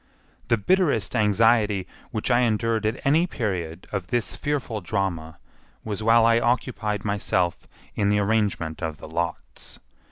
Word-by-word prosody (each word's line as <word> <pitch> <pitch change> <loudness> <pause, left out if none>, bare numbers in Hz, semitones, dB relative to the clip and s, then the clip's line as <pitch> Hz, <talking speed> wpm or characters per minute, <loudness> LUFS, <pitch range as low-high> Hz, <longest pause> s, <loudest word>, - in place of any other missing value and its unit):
The 115 0 +3
bitterest 140 - +1
anxiety 105 -2 +3 0.2
which 110 +2 -2
I 120 - +4
endured 115 -2 +1
at 110 +4 -2
any 160 +6 +3
period 95 - -3
of 95 -3 -3
this 120 0 -1
fearful 135 -7 -3
drama 85 -4 -3 0.5
was 105 -1 -4
while 115 +1 +5
I 115 0 +4
occupied 115 -4 -1
myself 95 -4 -1 0.3
in 100 -1 +1
the 105 - +3
arrangement 100 -6 0
of 80 -3 -3
the - - -10
lots. 85 +2 -5
105 Hz, 140 wpm, -24 LUFS, 95-115 Hz, 0.5 s, while